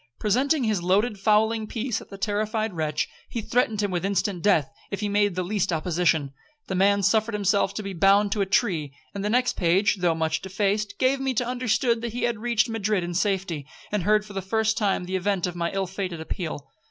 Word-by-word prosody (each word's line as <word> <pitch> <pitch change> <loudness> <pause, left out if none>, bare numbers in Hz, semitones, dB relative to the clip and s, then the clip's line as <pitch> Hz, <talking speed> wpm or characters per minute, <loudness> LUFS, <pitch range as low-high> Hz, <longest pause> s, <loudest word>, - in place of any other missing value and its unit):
Presenting 260 +7 +1
his 215 -5 0
loaded 200 +4 +1
fowling 215 +1 +2
piece 235 +1 -2
at - - -14
the 195 - -9
terrified 215 +1 -1
wretch, 155 -2 -1 0.2
he 235 - -3
threatened 220 -2 0
him 200 - -1
with 175 -1 -2
instant 195 -2 -1
death, 165 -8 +3 0.2
if 200 - -4
he 210 - 0
made 205 -2 +1
the 185 - -1
least 195 0 -1
opposition. 160 -3 +1 0.3
The - - -4
man 200 +2 +3
suffered 220 +2 +2
himself 200 -1 +1
to 215 - -3
be 195 -1 -5
bound 195 +3 +4
to 205 - 0
a 195 - 0
tree; 165 - 0 0.2
and 200 - -4
the 210 - 0
next 250 +2 +2
page, 190 +4 +2
though 175 -3 +1
much 160 0 -1
defaced, 205 +2 -1
gave 265 +1 +2
me 265 -1 -1
to 245 - +1
understand 235 -1 0
he 235 +1 -3
had 235 -3 0
reached 235 0 +1
Madrid 215 -4 0
in 175 0 -4
safety, 185 -6 -1 0.2
and 210 -2 0
heard 210 +3 +2
for 205 - -11
the 195 - -3
first 220 +3 +1
time 200 -4 0
the 185 +1 -4
event 190 -1 0
of 180 -1 -4
my 170 -1 -1
ill 195 0 -1
fated 185 -2 -4
appeal. 160 -3 -5
200 Hz, 215 wpm, -25 LUFS, 185-220 Hz, 0.3 s, bound